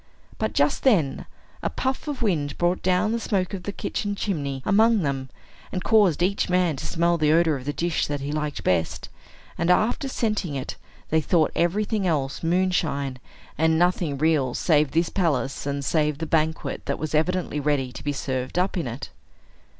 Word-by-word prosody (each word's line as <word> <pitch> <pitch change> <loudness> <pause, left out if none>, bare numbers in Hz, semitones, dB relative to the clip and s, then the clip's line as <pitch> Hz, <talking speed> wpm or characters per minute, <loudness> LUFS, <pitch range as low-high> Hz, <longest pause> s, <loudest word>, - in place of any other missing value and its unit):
But, - - -1
just - - +2
then, 175 - +2 0.3
a - - -1
puff 260 +3 -3
of 285 -4 -3
wind 150 -9 0
brought 175 +1 +1
down 185 +3 +2
the 230 - 0
smoke 195 -4 -1
of 190 - -4
the 205 - -4
kitchen 205 0 -3
chimney 140 -10 -3
among 220 0 +4
them, 135 -2 -2 0.4
and 185 - -3
caused 200 -7 +4
each 195 +1 +1
man 180 -3 +2
to - - -5
smell 170 0 +1
the 155 -1 +3
odor 165 -1 +4
of 130 -2 -7
the 145 - -1
dish 165 +2 -1
that 145 -1 -2
he 140 +1 -4
liked 150 -1 -3
best; 85 -3 0 0.5
and, 170 +1 +1
after 215 +9 +2
scenting 215 - -1
it, 130 - -4 0.4
they 160 0 +3
thought 155 +1 +2
everything 200 +3 +1
else 140 -5 -1
moonshine, 165 -7 0 0.4
and 160 0 +3
nothing 175 -4 +1
real 145 -4 +2
save 150 -4 +3
this 165 +3 +1
palace, 145 -7 -1
and 140 0 -2
save 150 -2 +1
the 160 - -3
banquet 160 0 -1
that 140 - -1
was 155 0 -4
evidently 165 0 0
ready 140 -3 0
to 125 - -9
be 145 - 0
served 130 0 -3
up 185 +2 +1
in 165 - -2
it. 120 +4 -6
160 Hz, 185 wpm, -24 LUFS, 145-185 Hz, 0.5 s, among